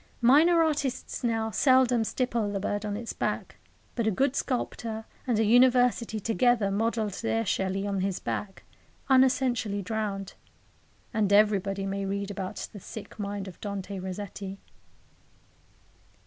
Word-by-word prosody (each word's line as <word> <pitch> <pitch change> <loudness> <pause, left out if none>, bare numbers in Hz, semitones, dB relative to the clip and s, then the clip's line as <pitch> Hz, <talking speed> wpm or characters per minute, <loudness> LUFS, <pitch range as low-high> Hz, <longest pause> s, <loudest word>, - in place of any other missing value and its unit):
Minor 315 +8 +6
artists 290 -6 -2
now 225 -2 0
seldom 255 -2 +4
stipple 230 -3 -1
the 200 - -2
bird 205 +1 -2
on 205 0 -2
its 230 +1 -5
back, - - -3 0.4
but 230 -2 -1
a - - +5
good 265 +6 +1
sculptor 230 -4 -3 0.2
and 240 -4 +2
a 225 - +3
University 245 -1 +4
together 225 0 +2
modelled 220 0 0
their 225 0 0
Shelley 190 0 -1
on 200 -2 -1
his 190 -1 -1
back, 195 -2 -4 0.5
unessentially 250 -6 +3
drowned; 200 -2 -3 0.8
and 210 -3 +1
everybody 200 -1 +3
may 195 0 -2
read 200 +1 -3
about 190 -2 -5
the 205 - -8
sick 215 +3 -10
mind 200 -1 -4
of 180 - -11
Dante 200 -1 -5
Rossetti. 195 +1 -6
215 Hz, 135 wpm, -28 LUFS, 200-240 Hz, 0.8 s, Minor